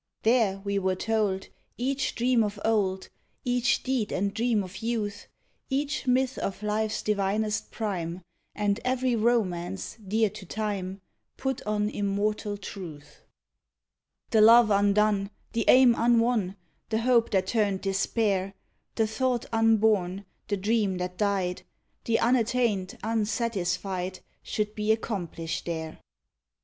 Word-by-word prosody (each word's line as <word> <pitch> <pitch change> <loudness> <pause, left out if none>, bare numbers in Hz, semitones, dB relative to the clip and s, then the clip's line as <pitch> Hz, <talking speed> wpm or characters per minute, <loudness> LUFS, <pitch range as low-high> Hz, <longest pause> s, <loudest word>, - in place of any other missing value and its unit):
There, 225 -4 +3
we 200 0 0
were 190 -1 0
told, 205 -2 -1 0.3
each 270 +3 -1
dream 245 -1 +3
of 205 -1 -3
old, 195 -4 +1 0.4
Each 245 0 +1
deed 255 -5 -1
and 200 +1 -1
dream 225 -2 +1
of 185 +1 -9
youth, 215 -2 -3 0.4
Each 285 +1 -1
myth 260 +1 +2
of 195 +1 -4
life's 215 +1 -1
divinest 210 +1 0
prime, 185 -5 -4 0.3
And 205 0 0
every 255 -1 +1
romance, 195 -6 0
dear 215 +1 +1
to - - -10
time, 195 -1 -4 0.4
Put 265 0 -2
on 210 0 +1
immortal 205 0 -1
truth. 175 -7 -9 1.1
The 220 - +5
love 230 0 +7
undone, 200 0 +3 0.2
the 230 -1 0
aim 255 -1 +7
unwon, 230 -4 +2 0.3
The 220 0 0
hope 235 -1 +3
that 190 -2 +1
turned 200 -2 0
despair; 195 0 0 0.4
The 225 - +2
thought 240 +2 -1
unborn; 215 -4 +2 0.2
the 205 - 0
dream 205 -1 +1
that 180 0 -5
died; 195 -3 0 0.4
The 230 -1 +2
unattained, 230 -5 +1
unsatisfied, 195 -4 -1 0.2
Should 210 0 -2
be 215 0 0
accomplished 175 -8 -3
there. 160 -2 -4
210 Hz, 125 wpm, -27 LUFS, 195-230 Hz, 1.1 s, love